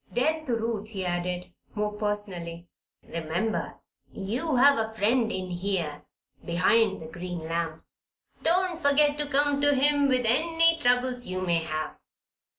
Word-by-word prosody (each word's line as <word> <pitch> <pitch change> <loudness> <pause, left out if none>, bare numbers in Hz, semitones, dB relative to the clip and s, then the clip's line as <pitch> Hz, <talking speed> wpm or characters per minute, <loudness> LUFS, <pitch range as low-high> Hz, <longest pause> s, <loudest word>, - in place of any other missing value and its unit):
Then 310 +4 0
to 240 - +1
Ruth 225 -2 -3
he 195 -4 -4
added, 180 0 -3 0.2
more 210 0 -1
personally: 195 -5 -2 0.4
"Remember 170 +7 -3 0.4
you 245 +10 -2
have 275 +1 +5
a 220 0 -3
friend 225 +2 +2
in 185 -2 -4
here 175 -5 -3 0.4
behind 195 +4 +2
the 160 - -9
green 175 +2 -6
lamps. 165 0 -4 0.4
Don't 355 0 +1
forget 290 +1 +3
to 295 - -1
come 285 0 +2
to 290 0 +4
him 285 +1 +4
with 255 -2 +1
any 330 +7 +4
troubles 250 -1 +1
you 185 0 -3
may 170 -2 +1
have. 155 -1 -4
220 Hz, 145 wpm, -27 LUFS, 180-280 Hz, 0.4 s, have